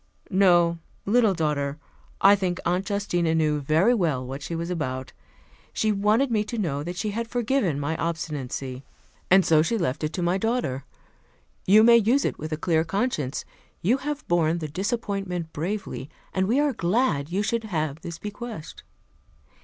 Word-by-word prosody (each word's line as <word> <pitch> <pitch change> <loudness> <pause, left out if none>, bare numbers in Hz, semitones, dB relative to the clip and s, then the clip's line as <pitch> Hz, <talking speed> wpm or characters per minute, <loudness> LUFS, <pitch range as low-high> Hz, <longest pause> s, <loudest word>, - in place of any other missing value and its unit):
"No, 175 -3 +4 0.3
little 220 -2 +3
daughter. 150 -3 -1 0.4
I 200 +1 +8
think 185 -3 -2
Aunt 180 +4 0
Justina 175 -5 0
knew 155 -2 +2
very 160 - +3
well 155 - 0
what 135 +3 -6
she 165 - -4
was 170 +2 -3
about. 130 -6 -3 0.6
She 215 - +1
wanted 210 +6 +2
me 215 -2 +2
to 230 +3 -5
know 155 -9 -1
that 175 +4 -5
she 210 +3 -2
had 230 +2 -3
forgiven 230 - 0
my 145 +3 -1
obstinacy, 140 -5 -4 0.5
and 190 0 +6
so 155 -2 +5
she 225 +9 0
left 160 -6 -2
it 155 - -1
to 180 - -2
my 175 +3 +1
daughter. 190 - -1 0.8
You 210 +3 +7
may 235 +1 +8
use 235 +6 +3
it - - -2
with 155 +1 -5
a 155 - -1
clear 160 0 +1
conscience. 165 - -2 0.4
You 230 +9 +3
have 295 +2 -5
borne 170 -1 +2
the 160 -2 -4
disappointment 190 -1 -3
bravely, 155 - -4 0.2
and 190 0 +1
we 245 +6 +2
are 290 -2 +2
glad 180 - +1
you 195 +3 0
should 225 +1 -1
have 155 -6 -2
this 170 0 -6
bequest." 210 -4 -7
175 Hz, 170 wpm, -25 LUFS, 155-215 Hz, 0.8 s, I